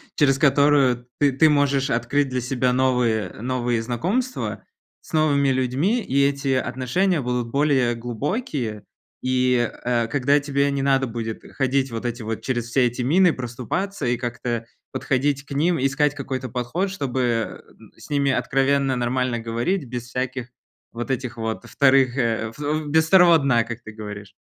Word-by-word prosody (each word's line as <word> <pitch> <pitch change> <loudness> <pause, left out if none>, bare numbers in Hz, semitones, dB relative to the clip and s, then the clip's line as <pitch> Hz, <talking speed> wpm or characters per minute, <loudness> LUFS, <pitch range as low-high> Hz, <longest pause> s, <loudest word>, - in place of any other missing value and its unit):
через 135 -3 +3
которую 140 -4 +3
ты 145 -1 +4
ты 155 +4 +4
можешь 140 -1 +2
открыть 130 +4 0
для 130 0 -2
себя 125 0 0
новые 125 -6 +1
новые 120 -1 -1
знакомства 185 - -2 0.4
с - - -17
новыми 145 -3 +3
людьми. 135 - +1
И 140 -7 +1
эти 140 -1 0
отношения 145 +7 0
будут 125 -1 -2
более 135 -4 +2
глубокие. 120 - -3 0.4
И, 125 -2 +2
э, 120 -2 +1
когда 140 +3 +2
тебе 140 0 0
не 140 - -1
надо 135 -1 +2
будет 115 -1 -5
ходить 135 -1 0
вот 115 +1 -5
эти 120 -1 -5
вот 110 0 -4
через 120 -3 -2
все 125 -1 +3
эти 120 +1 -3
мины 175 +6 +4
проступаться 130 - -4
и 120 - +1
как-то 120 -1 -3 0.3
подходить 140 +1 -1
к - - -19
ним, 160 +5 +1
искать 140 +2 +1
какой-то 130 -3 -4
подход, 125 - -2
чтобы, 135 -9 -2
э, 115 -2 -1 0.4
с - - -13
ними 140 -1 +1
откровенно 135 0 +1
нормально 125 0 0
говорить. 120 +9 -2
Без 120 0 -6
всяких 125 0 -4 0.4
вот 120 +3 -4
этих 125 -2 -3
вот 110 +1 -4
вторых, 135 -2 +3
э, 115 -3 0
о - - -12
во 150 +1 -2
без 160 +2 +3
второго 175 -2 +7
дна, 135 -5 +2
как 115 +1 -7
ты 110 - -9
говоришь. 105 -2 -9
130 Hz, 160 wpm, -23 LUFS, 120-140 Hz, 0.4 s, второго